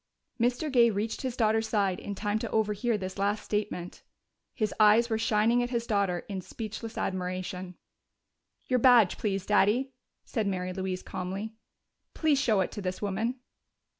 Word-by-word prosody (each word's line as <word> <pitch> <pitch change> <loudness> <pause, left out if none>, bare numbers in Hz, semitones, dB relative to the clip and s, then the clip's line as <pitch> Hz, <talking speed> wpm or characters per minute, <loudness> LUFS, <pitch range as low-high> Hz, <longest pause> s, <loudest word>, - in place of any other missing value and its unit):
Mr. 245 +6 +1
Gay 240 -3 +6
reached 215 +1 -2
his 255 -3 -3
daughter's 220 -1 +2
side 200 -4 +1
in 200 - -5
time 210 +1 -1
to - - -4
overhear 215 +1 0
this 190 0 -6
last 205 +2 0
statement. 205 -4 -3 0.5
His 215 -4 -1
eyes 220 +3 +5
were 220 - +1
shining 225 +2 +3
at 245 - -1
his 235 -2 -1
daughter 200 -5 0
in 195 -2 -4
speechless 220 +3 -7
admiration. 185 0 -3 0.9
"Your 255 -1 +1
badge, 235 -6 +5
please, 195 -3 -1
Daddy," 215 +6 +2 0.3
said 220 -4 -2
Mary 185 -1 -2
Louise 185 -1 -3
calmly. 195 +4 -5 0.6
"Please 305 -4 +2
show 215 -7 +3
it 185 - -1
to 205 - -6
this 185 -1 -3
woman." 215 +5 -1
210 Hz, 160 wpm, -29 LUFS, 190-230 Hz, 0.9 s, Gay